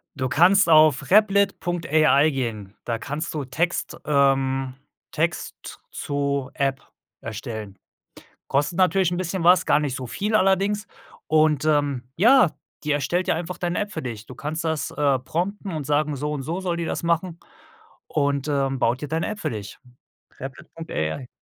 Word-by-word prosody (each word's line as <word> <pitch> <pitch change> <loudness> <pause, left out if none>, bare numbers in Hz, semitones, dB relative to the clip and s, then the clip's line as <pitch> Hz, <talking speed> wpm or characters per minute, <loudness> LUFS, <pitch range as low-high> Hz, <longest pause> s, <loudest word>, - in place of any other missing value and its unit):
Du 130 -2 -2
kannst 180 +6 +5
auf 155 -4 +5
Replit.ai 175 -7 +3
gehen. 110 -7 -4
Da 115 -1 -2
kannst 150 +5 -4
du 150 -3 -3
Text, 165 +7 -2
ähm 135 -2 +2 0.4
Text - - -1
z - - -9
zu 140 -1 -2
App 135 -1 -1 0.4
erstellen. 110 -2 -6 0.7
Kostet 145 +5 0
natürlich 185 -1 +3
‘n 175 - -1
bisschen 185 -1 -2
was, 180 +2 +5
gar 150 - +4
nicht 145 -4 -2
so 130 -1 -5
viel 210 - -1
allerdings 195 +1 +2 0.4
,und, 155 -2 +3
ähm, 145 -4 +1
ja, 235 - +5 0.3
die 150 - -1
erstellt 170 +5 0
dir - - +2
einfach 175 +1 -5
deine 175 0 -2
App 205 0 -3
für 160 - -5
dich. 110 -3 -6
Du 130 - -10
kannst 155 +3 -4
das, 160 -2 -2
äh, 140 -3 +1
prompten 190 +9 -3
und 150 -3 -4
sagen 150 0 +1
so 150 +2 -3
und 140 -3 -3
so 170 +6 -3
soll 175 -2 -2
die 170 - -2
das - - -3
machen, 170 +1 0 0.7
und 140 -1 0
äh, 140 -2 +1
baut 125 -1 0
dir 150 - -4
deine 160 +1 -1
App 215 -1 -5
für - - -2
dich. 105 -2 -7 0.6
Replit.ai. 130 - -5
150 Hz, 165 wpm, -23 LUFS, 135-175 Hz, 0.7 s, kannst